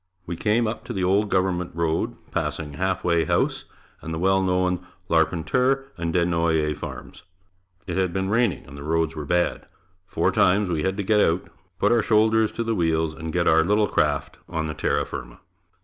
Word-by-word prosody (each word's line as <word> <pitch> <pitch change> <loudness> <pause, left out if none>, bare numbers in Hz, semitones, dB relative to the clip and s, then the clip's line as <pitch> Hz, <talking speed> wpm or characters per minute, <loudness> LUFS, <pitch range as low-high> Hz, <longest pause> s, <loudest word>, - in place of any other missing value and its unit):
We 85 - -4
came 110 +6 +1
up 110 +1 -3
to - - -5
the 95 - -2
old 100 +3 +2
government 90 -3 0
road 85 -1 -1 0.2
passing 75 -1 -3
the 70 - -11
"Half 95 -1 0
Way 85 -2 +2
House" - - 0 0.4
and 80 - -6
the 80 - -3
well 95 +3 +2
known 90 -1 0 0.3
Larpenteur 125 - +1
and 85 -1 -3
Des 85 0 +2
Noyer 85 -3 +1
farms. - - -8 0.6
It 90 -2 -3
had 95 -2 +1
been 95 +2 -1
raining 115 -1 +1
and 70 - -12
the 70 - -9
roads 80 +1 0
were 75 -1 -5
bad. 90 +4 0 0.4
Four - - +1
times 95 +1 +3
we 80 -2 0
had 95 +3 -1
to 100 - -1
get 105 +2 +3
out, 85 -2 +1 0.3
put - - +2
our 120 -1 +4
shoulders 110 +1 +3
to 115 - -2
the 115 0 -1
wheels 80 -4 +1
and 80 0 -6
get 85 +1 0
our 80 0 +5
little 105 +4 +2
craft - - 0
on 80 -1 -2
the 75 - -3
terra - - 0
firma. - - -8
90 Hz, 200 wpm, -24 LUFS, 80-100 Hz, 0.6 s, our